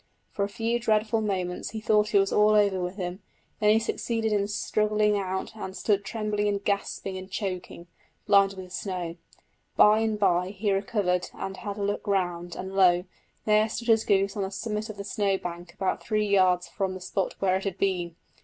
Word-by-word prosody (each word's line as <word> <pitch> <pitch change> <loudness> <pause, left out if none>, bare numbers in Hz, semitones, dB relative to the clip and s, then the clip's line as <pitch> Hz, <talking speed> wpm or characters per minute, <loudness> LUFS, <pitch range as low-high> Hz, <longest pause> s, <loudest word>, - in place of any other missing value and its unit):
For 200 - -2
a 200 - -1
few 230 +3 -1
dreadful 220 -1 +1
moments 185 -4 -2
he 220 - -5
thought 215 -1 +2
it - - +8
was 195 0 +1
all 210 0 +5
over 200 -3 +3
with 180 +1 -3
him; 185 0 -5 0.4
then 210 - +3
he 215 - +6
succeeded 225 0 -1
in 200 -1 +1
struggling 210 0 +1
out 190 +1 -3
and 190 -3 -6
stood 200 +1 +1
trembling 210 -1 -1
and 200 -1 -1
gasping 200 -1 -2
and 185 0 -10
choking, 185 -3 -5 0.4
blinded 200 -1 +4
with 185 -1 -9
snow. 180 -4 -4 0.6
By 210 +1 +7
and 220 -1 0
bye 185 -1 +1
he 205 0 0
recovered 195 -2 0
and 195 0 -5
had 205 -2 -5
a 205 - -3
look 205 +1 -2
round, 175 -3 -1
and 190 0 -6
lo! 180 -2 +5 0.4
there 215 +1 +4
stood 235 +2 -4
his 225 -1 +5
goose 195 -1 +2
on 205 - -2
the 190 - -1
summit 210 +2 -4
of 215 - -7
the 200 - -5
snow 200 -1 0
bank 175 -1 -7
about 190 - -1
three 215 -1 0
yards 185 -3 +3
from 190 +2 -3
the - - -6
spot 185 +1 -2
where 190 -1 +2
it 190 - -6
had 195 -3 -3
been! 180 -4 -1
200 Hz, 200 wpm, -27 LUFS, 185-210 Hz, 0.6 s, it